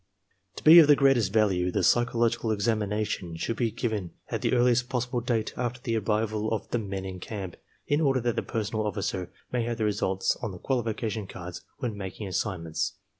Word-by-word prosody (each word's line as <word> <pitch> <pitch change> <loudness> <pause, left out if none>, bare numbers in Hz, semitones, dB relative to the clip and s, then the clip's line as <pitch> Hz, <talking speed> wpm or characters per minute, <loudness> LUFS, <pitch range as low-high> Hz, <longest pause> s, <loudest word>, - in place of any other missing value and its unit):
To - - -9
be 165 +3 +10
of 155 - +8
the 145 - +7
greatest 135 -8 +3
value 95 -5 +2
the - - 0
psychological 120 -1 +2
examination 105 -4 -1
should 115 +7 -2
be 120 - +1
given 110 -5 -3 0.2
at - - -2
the - - +1
earliest 125 0 +3
possible 125 -1 -1
date 115 -2 -1
after 125 0 -2
the 120 -2 -2
arrival 110 0 0
of 110 - -2
the 120 - +1
men 100 -3 -4
in 95 -1 -6
camp, 95 -3 -6 0.3
in 145 +2 +1
order 135 -4 +3
that 120 -1 0
the - - 0
personnel 110 -1 -2
officer 95 -3 -3 0.2
may 125 - 0
have 120 -1 -2
the 110 - 0
results 95 -2 0
on 100 - -3
the - - -8
qualification 110 -3 -2
cards 90 -2 -8 0.2
when 125 -6 -3
making 100 +1 -6
assign 90 -1 -2
ments. 80 -1 -2
110 Hz, 195 wpm, -27 LUFS, 100-120 Hz, 0.3 s, be